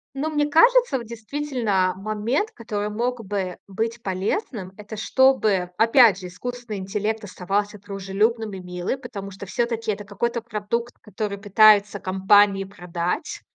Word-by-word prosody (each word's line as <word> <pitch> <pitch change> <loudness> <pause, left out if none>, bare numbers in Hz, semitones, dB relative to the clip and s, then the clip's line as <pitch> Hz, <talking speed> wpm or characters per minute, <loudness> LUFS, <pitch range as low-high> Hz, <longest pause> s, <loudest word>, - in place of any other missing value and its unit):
Но 300 +4 -1
мне 295 -1 +1
кажется, 470 - +5
вот 235 - -9
действительно, 230 -5 -1
момент, 215 - -1
который 210 -2 -4
мог 235 +2 -2
бы 190 -2 -3
быть 225 +4 -3
полезным,- 195 - -2
это 210 +1 -8
чтобы, 215 -6 +2
опять 230 -3 +6
же, 185 - -7
искусственный 240 +3 -6
интеллект 210 +3 -2
оставался 200 +2 -2
дружелюбным 205 +3 -1
и 190 - -6
милым, 180 +8 -4
потому 195 -5 -7
что 195 +1 -9
всё-таки 230 +1 -1
это 205 0 -5
какой-то 235 +4 -2
продукт, 225 +3 -3
который 205 -1 -4
пытаются 205 0 +5
компании 195 +1 +4
продать. 180 - -4
210 Hz, 135 wpm, -23 LUFS, 195-235 Hz, -, опять